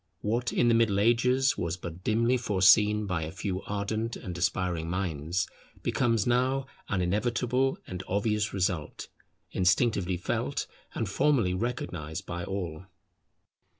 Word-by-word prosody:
What 120 Hz, +4 st, 0 dB
in 120 Hz, -, +2 dB
the 120 Hz, -, +5 dB
Middle 115 Hz, -4 st, +3 dB
Ages 125 Hz, +5 st, +3 dB
was 85 Hz, 0 st, -2 dB
but 85 Hz, 0 st, -8 dB
dimly 115 Hz, +3 st, +2 dB
foreseen 105 Hz, -1 st, +4 dB
by 90 Hz, -4 st, -1 dB
a 80 Hz, 0 st, -4 dB
few 95 Hz, 0 st, -3 dB
ardent 110 Hz, +3 st, -2 dB
and 90 Hz, -, -7 dB
aspiring 85 Hz, -1 st, -1 dB
minds, 85 Hz, -1 st, -1 dB, 0.4 s
becomes 115 Hz, -5 st, +1 dB
now 130 Hz, +2 st, +2 dB, 0.2 s
an 95 Hz, -2 st, +1 dB
inevitable 120 Hz, +7 st, +1 dB
and 90 Hz, 0 st, -6 dB
obvious 105 Hz, +2 st, 0 dB
result, 90 Hz, -5 st, -2 dB, 0.4 s
instinctively 95 Hz, -1 st, +2 dB
felt 90 Hz, -, -2 dB, 0.3 s
and 110 Hz, -, -1 dB
formally 115 Hz, -2 st, +2 dB
recognized 90 Hz, -6 st, -3 dB
by 85 Hz, 0 st, -4 dB
all. 95 Hz, -3 st, -5 dB
100 Hz, 130 wpm, -29 LUFS, 90-115 Hz, 0.4 s, the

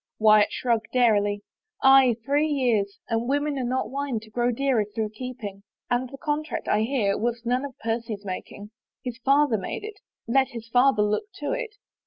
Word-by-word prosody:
Wyatt 215 Hz, -1 st, +5 dB
shrugged 230 Hz, -1 st, -1 dB
airily. 205 Hz, -4 st, +3 dB, 0.2 s
" 440 Hz, -, -38 dB
Aye, 270 Hz, -3 st, +7 dB
three 290 Hz, +3 st, +2 dB
years, 235 Hz, -9 st, 0 dB
and 230 Hz, +1 st, -1 dB
women 285 Hz, 0 st, 0 dB
are -, -, -1 dB
not 255 Hz, +2 st, -1 dB
wine 275 Hz, -4 st, -2 dB
to 220 Hz, 0 st, -15 dB
grow 240 Hz, +2 st, +1 dB
dearer 255 Hz, -2 st, +1 dB
through 210 Hz, +1 st, -3 dB
keeping. 215 Hz, -3 st, -7 dB, 0.3 s
And 245 Hz, +1 st, +1 dB
the 275 Hz, -, -9 dB
contract, 305 Hz, 0 st, -3 dB
I 210 Hz, -, +2 dB
hear, 220 Hz, -4 st, +1 dB
was 235 Hz, +1 st, -2 dB
none 250 Hz, +3 st, +1 dB
of 270 Hz, -3 st, -9 dB
Percy's 225 Hz, -2 st, -3 dB
making. 205 Hz, +2 st, -7 dB, 0.3 s
His 245 Hz, -1 st, -5 dB
father 275 Hz, -2 st, +3 dB
made 195 Hz, -, -5 dB
it 420 Hz, -1 st, -8 dB, 0.2 s
— -, -, -63 dB
let 265 Hz, -1 st, +4 dB
his 230 Hz, -1 st, -9 dB
father 245 Hz, -2 st, +4 dB
look 210 Hz, -, 0 dB
to 405 Hz, -, -3 dB
it." -, -, -3 dB
240 Hz, 190 wpm, -25 LUFS, 215-275 Hz, 0.3 s, Aye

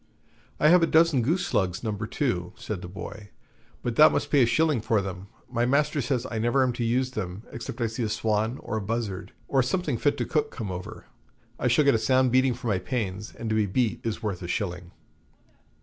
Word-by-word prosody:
'I 150 Hz, -, +5 dB
have 180 Hz, +1 st, +6 dB
a 165 Hz, -, +4 dB
dozen 160 Hz, -5 st, +4 dB
goose 170 Hz, +9 st, +1 dB
slugs, 95 Hz, -, 0 dB
No. 110 Hz, -, -1 dB
2,' 105 Hz, -3 st, -2 dB
said 105 Hz, -4 st, -5 dB
the 90 Hz, -, -7 dB
boy; 100 Hz, +3 st, -8 dB, 0.5 s
'but 120 Hz, -2 st, -2 dB
thou 155 Hz, +1 st, +9 dB
must -, -, -2 dB
pay 145 Hz, -, +5 dB
a -, -, +6 dB
shilling 155 Hz, -1 st, +2 dB
for 110 Hz, 0 st, +2 dB
them. 95 Hz, -1 st, -5 dB, 0.2 s
My 120 Hz, -1 st, -1 dB
master 145 Hz, +2 st, +2 dB
says 125 Hz, 0 st, -1 dB
I 110 Hz, -, -2 dB
never 120 Hz, +4 st, +2 dB
am 125 Hz, -1 st, +1 dB
to 120 Hz, -, -3 dB
use 125 Hz, +3 st, +1 dB
them, 100 Hz, -3 st, -5 dB
except 120 Hz, +1 st, -7 dB
I -, -, +2 dB
see 115 Hz, +2 st, -3 dB
a 110 Hz, -, 0 dB
swan 110 Hz, +2 st, 0 dB
or 110 Hz, -, -2 dB
buzzard, 105 Hz, -3 st, -3 dB, 0.2 s
or 135 Hz, -, +3 dB
something 145 Hz, -2 st, -1 dB
fit 145 Hz, -, +1 dB
to -, -, -1 dB
cook, 150 Hz, -1 st, 0 dB
come 105 Hz, -6 st, -5 dB
over: 90 Hz, 0 st, -7 dB, 0.5 s
I -, -, +1 dB
shall 130 Hz, +5 st, +4 dB
get 140 Hz, -, +5 dB
a 115 Hz, -, +2 dB
sound 130 Hz, +1 st, +3 dB
beating 130 Hz, 0 st, +3 dB
for 125 Hz, -, -11 dB
my 105 Hz, -5 st, +1 dB
pains, 105 Hz, -1 st, -4 dB
and 115 Hz, -, -6 dB
to -, -, +2 dB
be 110 Hz, -2 st, +2 dB
beat 115 Hz, +4 st, 0 dB
is 115 Hz, 0 st, -3 dB
worth 100 Hz, -4 st, -3 dB
a 85 Hz, -, -5 dB
shilling.' 90 Hz, -2 st, -3 dB
115 Hz, 225 wpm, -26 LUFS, 105-130 Hz, 0.5 s, thou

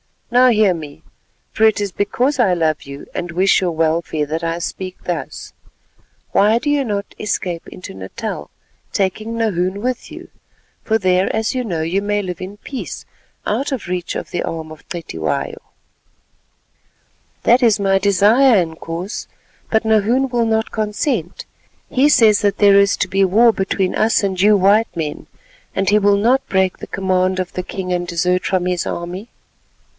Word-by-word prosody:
Now 250 Hz, +1 st, +6 dB
hear 215 Hz, -5 st, +4 dB
me, 155 Hz, -1 st, -9 dB, 0.5 s
for 220 Hz, -, +2 dB
it 220 Hz, -1 st, +3 dB
is 200 Hz, -2 st, -2 dB
because 255 Hz, +9 st, 0 dB
I 205 Hz, -7 st, +4 dB
love 160 Hz, -3 st, 0 dB
you 140 Hz, 0 st, -9 dB
and 175 Hz, -1 st, -4 dB
wish 185 Hz, +3 st, +3 dB
your 180 Hz, -2 st, 0 dB
welfare 160 Hz, -1 st, 0 dB
that 160 Hz, +3 st, -3 dB
I 165 Hz, 0 st, -1 dB
speak 185 Hz, +2 st, -6 dB
thus. 175 Hz, -2 st, -5 dB, 0.8 s
Why 210 Hz, +3 st, +4 dB
do 260 Hz, +5 st, -2 dB
you 290 Hz, -1 st, +2 dB
not 205 Hz, -4 st, -3 dB
escape 180 Hz, -5 st, -3 dB
into 180 Hz, -, -9 dB
Natal, 95 Hz, -5 st, -6 dB, 0.4 s
taking 215 Hz, +4 st, -1 dB
Nahoon 195 Hz, -3 st, -1 dB
with 250 Hz, +1 st, -3 dB
you, -, -, -10 dB, 0.5 s
for 220 Hz, -, +2 dB
there 185 Hz, -2 st, +2 dB
as 220 Hz, +3 st, 0 dB
you 255 Hz, -1 st, -2 dB
know 170 Hz, -7 st, -2 dB
you 170 Hz, +5 st, 0 dB
may 205 Hz, 0 st, 0 dB
live 180 Hz, -2 st, -6 dB
in 190 Hz, +3 st, -7 dB
peace 260 Hz, +4 st, -7 dB, 0.4 s
out 280 Hz, +2 st, -1 dB
of 255 Hz, -, -5 dB
reach 180 Hz, -1 st, -3 dB
of -, -, -5 dB
the -, -, -2 dB
arm 160 Hz, -1 st, -5 dB
of 155 Hz, -, -13 dB
Cetywayo?" 120 Hz, -, -3 dB, 1.9 s
"That 245 Hz, +3 st, +4 dB
is 225 Hz, -4 st, +4 dB
my 195 Hz, -1 st, +2 dB
desire, 210 Hz, +7 st, +4 dB
Inkoos, 165 Hz, +4 st, -6 dB, 0.4 s
but 220 Hz, 0 st, +2 dB
Nahoon 220 Hz, +5 st, +2 dB
will 240 Hz, -2 st, +1 dB
not 220 Hz, 0 st, 0 dB
consent. 210 Hz, -, -2 dB, 0.4 s
He 265 Hz, +3 st, +3 dB
says 220 Hz, -7 st, +5 dB
that 205 Hz, -1 st, +1 dB
there 200 Hz, -1 st, +6 dB
is 200 Hz, 0 st, +3 dB
to 185 Hz, -, 0 dB
be 195 Hz, +1 st, +2 dB
war 225 Hz, +5 st, +5 dB
between 190 Hz, -2 st, -1 dB
us 220 Hz, -1 st, +2 dB
and 190 Hz, -2 st, -1 dB
you 210 Hz, +2 st, +5 dB
white 200 Hz, +2 st, +3 dB
men, 155 Hz, -3 st, -4 dB, 0.5 s
and 195 Hz, 0 st, +1 dB
he 210 Hz, +1 st, +4 dB
will 200 Hz, 0 st, +3 dB
not 245 Hz, +6 st, +2 dB
break 190 Hz, -1 st, +1 dB
the -, -, -8 dB
command 185 Hz, -1 st, 0 dB
of 185 Hz, -1 st, -3 dB
the 185 Hz, -, -3 dB
king 185 Hz, 0 st, -5 dB
and 175 Hz, 0 st, -2 dB
desert 180 Hz, +2 st, 0 dB
from 185 Hz, -2 st, 0 dB
his 180 Hz, -1 st, -1 dB
army." 180 Hz, +6 st, -5 dB
195 Hz, 170 wpm, -18 LUFS, 175-220 Hz, 1.9 s, Now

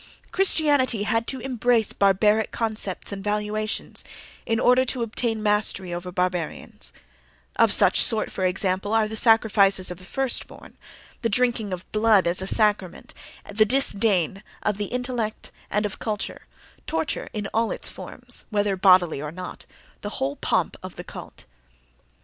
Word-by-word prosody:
Christianity 290 Hz, -, +3 dB
had 225 Hz, +2 st, 0 dB
to 265 Hz, -, -3 dB
embrace 245 Hz, -3 st, +1 dB
barbaric 210 Hz, +2 st, +3 dB
concepts 215 Hz, -5 st, -3 dB
and 195 Hz, -1 st, -6 dB
valuations 210 Hz, +1 st, -2 dB, 0.4 s
in 225 Hz, -1 st, +1 dB
order 250 Hz, +1 st, +4 dB
to 255 Hz, -1 st, -2 dB
obtain 225 Hz, -1 st, -2 dB
mastery 210 Hz, -3 st, +1 dB
over 175 Hz, +1 st, -5 dB
barbarians: 180 Hz, -3 st, -3 dB, 0.6 s
of -, -, +4 dB
such -, -, +5 dB
sort, 220 Hz, -1 st, +1 dB
for 190 Hz, -, -4 dB
example, 190 Hz, +3 st, 0 dB
are 220 Hz, -1 st, +3 dB
the 220 Hz, -, -6 dB
sacrifices 205 Hz, -5 st, +3 dB
of 180 Hz, -, -7 dB
the -, -, -14 dB
first 265 Hz, +6 st, -1 dB
born, -, -, -14 dB, 0.5 s
the 230 Hz, -, 0 dB
drinking 230 Hz, -2 st, 0 dB
of 185 Hz, 0 st, -5 dB
blood 215 Hz, -2 st, +4 dB
as 175 Hz, +2 st, +1 dB
a 190 Hz, -, -4 dB
sacrament, 205 Hz, -4 st, 0 dB, 0.4 s
the 215 Hz, +2 st, +5 dB
disdain 205 Hz, -, +2 dB, 0.2 s
of 210 Hz, -2 st, 0 dB
the 205 Hz, -, -2 dB
intellect 245 Hz, -2 st, -4 dB, 0.2 s
and 210 Hz, +1 st, 0 dB
of 205 Hz, -, -5 dB
culture; 210 Hz, -3 st, -4 dB, 0.4 s
torture -, -, -2 dB
in 210 Hz, -2 st, -4 dB
all 225 Hz, +1 st, +1 dB
its -, -, -4 dB
forms, -, -, -7 dB
whether 205 Hz, -2 st, 0 dB
bodily 185 Hz, -5 st, +4 dB
or 150 Hz, 0 st, -5 dB
not; 180 Hz, +2 st, -9 dB, 0.3 s
the 205 Hz, 0 st, -5 dB
whole 135 Hz, +2 st, -2 dB
pomp -, -, 0 dB
of -, -, -9 dB
the -, -, -7 dB
cult. -, -, -11 dB
210 Hz, 155 wpm, -24 LUFS, 190-225 Hz, 0.6 s, such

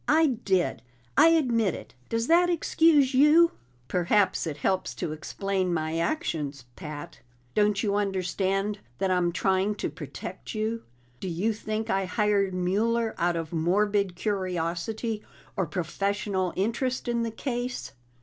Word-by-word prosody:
"I 320 Hz, +2 st, +5 dB
did; 195 Hz, -, 0 dB, 0.3 s
I -, -, +7 dB
admit 240 Hz, -, +3 dB
it. -, -, -10 dB, 0.2 s
Does 230 Hz, 0 st, 0 dB
that 345 Hz, +5 st, +4 dB
excuse 320 Hz, -5 st, +3 dB
you?" 300 Hz, +5 st, +6 dB, 0.4 s
"Perhaps 180 Hz, +1 st, +2 dB
it 150 Hz, -2 st, -4 dB
helps 150 Hz, -6 st, -1 dB
to 135 Hz, -, -3 dB
explain 185 Hz, +4 st, -2 dB
my 160 Hz, +1 st, -1 dB
actions, 150 Hz, -, -2 dB
Pat. 150 Hz, -4 st, -8 dB, 0.3 s
Don't 210 Hz, -1 st, +2 dB
you 205 Hz, -2 st, +1 dB
understand 195 Hz, 0 st, 0 dB, 0.2 s
that 190 Hz, +6 st, 0 dB
I'm 180 Hz, -1 st, +2 dB
trying 190 Hz, +3 st, +1 dB
to -, -, -3 dB
protect -, -, -8 dB
you? 220 Hz, +2 st, -1 dB, 0.4 s
Do 190 Hz, -, -5 dB
you 190 Hz, +7 st, 0 dB
think 215 Hz, +1 st, -3 dB
I 195 Hz, 0 st, +1 dB
hired 200 Hz, 0 st, +1 dB
Mueller 220 Hz, +6 st, +1 dB
out 175 Hz, 0 st, +2 dB
of 165 Hz, -1 st, -4 dB
morbid 195 Hz, +3 st, +1 dB
curiosity, 190 Hz, +3 st, -2 dB, 0.3 s
or 190 Hz, -4 st, 0 dB
professional 190 Hz, +3 st, -1 dB
interest 245 Hz, +6 st, -1 dB
in 235 Hz, -1 st, 0 dB
the 230 Hz, -, -1 dB
case? 245 Hz, +1 st, -4 dB
200 Hz, 140 wpm, -27 LUFS, 180-230 Hz, 0.4 s, I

